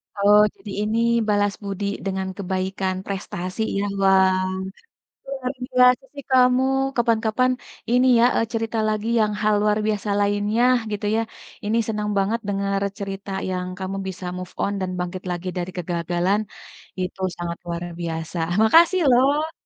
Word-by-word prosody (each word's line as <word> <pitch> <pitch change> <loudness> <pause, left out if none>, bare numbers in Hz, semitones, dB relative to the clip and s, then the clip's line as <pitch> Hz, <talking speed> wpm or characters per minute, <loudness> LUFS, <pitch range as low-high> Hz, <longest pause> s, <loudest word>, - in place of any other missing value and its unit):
Oh, 205 +1 +5 0.2
jadi 205 - -10 0.2
ini 220 - 0 0.3
balas 205 -1 +2
budi 200 0 -4 0.2
dengan 190 0 -2
kebaikan 190 0 -2
prestasi 185 0 -4 0.2
ya, - - 0 0.2
wow. 190 -1 +4 0.9
Luar 250 +1 -1
biasa 250 +1 +4
sih 280 -1 -8
kamu, 255 0 +5 0.3
kapan-kapan, 230 +1 +2 0.4
ini 250 +1 +4
ya, - - +6
eee, 230 - +2
cerita 225 0 -2
lagi 215 +1 -2
yang 210 -1 +2
hal 215 0 +3
luar 210 0 +2
biasa 210 -1 -1
lainnya 205 +3 +1 0.3
gitu 210 0 -3
ya. 225 - +2 0.4
Ini 220 +2 +1
senang 210 -1 -2
banget 205 +4 +1
denger 195 0 -1 0.2
cerita 195 0 -5 0.2
yang 180 0 -2
kamu 190 +1 -4
bisa 185 -1 -6
move 185 -1 -7
on 200 - 0
dan 185 -1 -2
bangkit 180 +1 -4
lagi 175 +1 -4
dari 180 +1 -3
kegagalan, 175 +3 0 0.6
itu 185 +1 -4 0.2
sangat 170 -1 -4
luar 170 0 -4 0.2
biasa. 165 +1 -4 0.2
Makasih 335 +11 +5
loh. 285 +6 +3
200 Hz, 145 wpm, -23 LUFS, 185-225 Hz, 0.9 s, ya